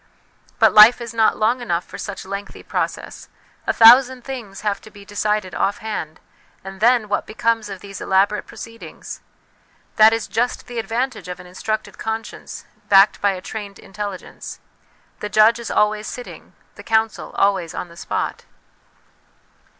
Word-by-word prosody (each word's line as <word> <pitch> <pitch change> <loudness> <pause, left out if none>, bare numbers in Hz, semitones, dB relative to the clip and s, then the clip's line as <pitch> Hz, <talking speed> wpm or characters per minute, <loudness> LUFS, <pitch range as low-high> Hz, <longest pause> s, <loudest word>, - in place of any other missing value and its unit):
But - - +5
life 215 +3 +9
is 235 -1 -7
not 225 -1 +3
long 235 +4 +1
enough 175 -7 -1
for - - -10
such 200 -2 -6
lengthy 200 +1 -7
process; - - -4 0.4
a - - +3
thousand 250 +2 +7
things 235 -7 -7
have 205 -2 -2
to - - -13
be 205 -1 -14
decided 205 -1 -1
off 200 - 0
hand, 175 -8 -5 0.4
and 195 0 -9
then 235 0 +3
what 205 - -2
becomes 225 -1 0
of 195 -2 -8
these 200 -1 -9
elaborate 195 +2 +1
proceedings? 230 0 -10 0.8
That 220 0 +8
is 225 -1 -2
just 240 +2 -1
the 240 -1 -5
advantage 230 -3 -3
of 180 -1 -6
an 180 - -11
instructed 215 +4 -4
conscience 220 0 -6 0.2
backed 195 +1 +6
by 200 -1 +3
a 185 - -7
trained 205 0 -7
intelli 200 -1 -6
gence; - - -10 0.6
the 210 - -4
judge 215 +3 +5
is 235 - -6
always 210 0 +1
sitting, 245 - -9 0.2
the - - -10
counsel 220 -1 0
always 190 -4 +1
on - - -4
the 170 - -15
spot. - - -4
215 Hz, 160 wpm, -21 LUFS, 195-230 Hz, 0.8 s, life